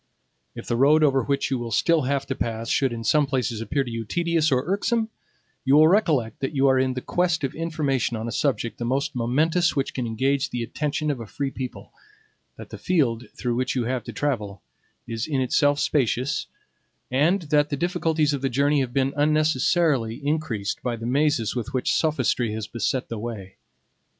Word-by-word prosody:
If - - -8
the 120 - -1
road 150 +4 +5
over 135 -3 +4
which 140 +2 -1
you 130 - 0
will 120 -1 -4
still 165 +8 +2
have 140 -1 0
to 135 - -2
pass 115 -2 -3
should 135 -3 +2
in 115 -1 -5
some 150 +4 +3
places 125 -4 -1
appear 135 +5 0
to 125 - -7
you 115 0 -3
tedious 165 +5 0
or 130 -1 +2
irksome, 220 +5 0 0.5
you 135 +1 +4
will 155 +1 +7
recollect 160 - +2
that 135 +2 -3
you 135 0 +3
are 130 0 +4
in 130 -1 0
quest 165 +4 0
of 135 - -1
information 150 -7 -1
on 110 +1 -4
a - - -3
subject 120 -1 -1
the - - -3
most 135 +5 -1
momentous 155 +8 +1
which 135 -1 -1
can 125 -2 -3
engage 135 +5 0
the 120 -1 -3
attention 150 +5 -2
of 135 - -4
a 115 - -7
free 135 +5 -3
people, 130 -2 -7 0.6
that - - -11
the - - -8
field 130 -10 0
through 125 -2 -2
which 125 +3 -1
you 125 - +1
have 125 +1 -2
to - - -6
travel 105 -9 -3 0.4
is 115 -1 -4
in 145 -4 0
itself 145 +3 +2
spacious, 130 -1 0 0.6
and 165 +9 +2
that 145 0 +4
the 145 - -2
difficulties 165 -2 +1
of 140 - -2
the 135 - 0
journey 140 +4 +2
have 130 -3 -2
been 135 0 +1
unnecessarily 150 -4 +2
increased 135 -10 -2
by 120 -1 -2
the 115 0 -7
mazes 135 -2 +1
with 125 +2 -4
which 130 - +1
sophistry 130 -7 +1
has 110 -1 -4
beset 125 +3 -2
the 115 - -5
way. 105 -4 -7
135 Hz, 200 wpm, -24 LUFS, 120-150 Hz, 0.6 s, will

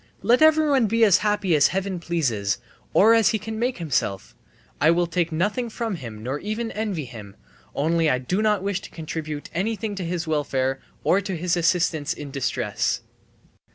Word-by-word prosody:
Let 245 +4 +4
everyone 305 -6 +5
be 230 +2 +2
as 200 -5 +6
happy 205 -5 +1
as 145 - +5
Heaven 190 -1 -2
pleases, 120 - -1 0.3
or 220 +3 +6
as 225 -2 +5
he 220 - +1
can 220 +1 -6
make 245 +2 0
himself; 130 - -2 0.5
I 155 - +5
will 175 +1 +3
take 170 0 -1
nothing 205 +9 -1
from 225 -1 -3
him 110 -6 -8
nor 130 +4 -3
even 220 +4 -3
envy 205 -8 -3
him, 110 -5 -10 0.4
only 160 +2 +2
I 130 - +2
do 180 +11 -1
not 210 -3 +2
wish 200 -1 -1
to - - -10
contribute 155 -2 -6
anything 210 +3 -2
to 195 -2 -4
his 175 0 -2
welfare 135 -4 0 0.2
or 195 - +3
to 195 -3 -4
his 175 +1 0
assistance 165 -3 +1
in 145 -2 -8
distress!" 135 -1 -1
175 Hz, 180 wpm, -24 LUFS, 150-215 Hz, 0.5 s, as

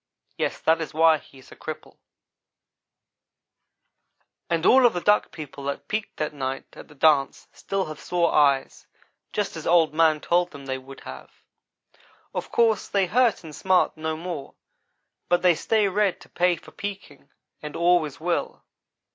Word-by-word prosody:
Yes, - - -2
that 165 +1 +2
is 160 - -6
why 160 -1 +5
he 135 - -19
is 130 - -17
a - - -11
cripple - - -8
to - - -33 2.5
day. 170 - +2
"And 165 +1 -3
all 255 -1 +7
of 235 - -1
the 175 - -1
Duck 210 +4 +2
people 145 -3 -9
that 140 - -4
peeked 215 0 -4
that 155 0 -2
night 135 -1 -4
at - - -12
the 150 - -17
dance 140 -2 +2
still 195 -1 -3
have 155 -1 -8
sore 175 -2 0
eyes 140 -2 +2 0.4
just 205 -4 -2
as 160 - -6
Old 165 -2 +4
man 160 -1 +3
told 175 +3 +1
them 140 -4 -11
they 130 -1 -3
would 135 +1 -13
have. - - -10 1.0
Of - - -5
course 225 -3 +2
they 200 -2 +1
hurt 230 +1 +2
and 155 -2 -10
smart 185 +2 +2
no 160 0 -3
more 165 -4 -6 0.7
but 175 +1 +2
they 180 -1 +6
stay 210 +5 +1
red 200 0 +1
to - - -16
pay 180 0 +2
for 165 - -15
peeking, 190 -9 -8 0.3
and 150 -1 -7
always 170 -4 +2
will. 170 +2 -2
165 Hz, 170 wpm, -24 LUFS, 150-185 Hz, 2.5 s, all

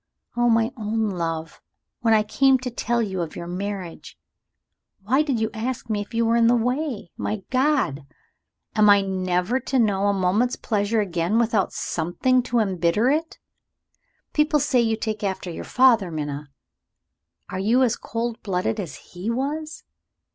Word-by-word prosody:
Oh, 240 0 +3
my 225 +1 +3
own 220 -1 -1
love! 165 -3 -4 0.4
when 230 -3 +1
I 215 - +3
came 270 +5 +3
to 250 -1 -5
tell 235 0 0
you 190 -4 -3
of 165 -2 -5
your 170 - -6
marriage, 185 -1 -6 0.9
why 260 +8 +3
did 275 -6 0
you 220 0 -1
ask 230 +1 -4
me 210 -1 0
if 205 - -9
you 230 0 +1
were 230 +1 +2
in 230 -1 +4
the 240 - +5
way? 250 - -2
My 210 -2 -3
God! 255 - +1 0.7
am 210 -1 +5
I 200 0 +7
never 185 +4 0
to 265 - -2
know 205 -4 +2
a 200 - +3
moment's 200 +6 +1
pleasure 215 0 0
again 180 +1 0
without 225 -4 +2
something 180 +10 0
to 240 -1 -2
embitter 195 +3 +2
it? 320 +2 -2 1.0
People 300 0 +3
say 265 -3 +2
you 225 -1 +1
take 215 -1 -3
after 190 -2 -3
your - - -6
father, 240 -7 +4
Minna. 145 -2 -5 1.0
Are 185 - -3
you 230 +7 +3
as 240 -2 +2
cold 230 0 -4
blooded 195 +2 -1
as 170 -8 -5 0.2
he 180 +5 -4
was? 295 +6 -3
220 Hz, 165 wpm, -23 LUFS, 190-245 Hz, 1.0 s, I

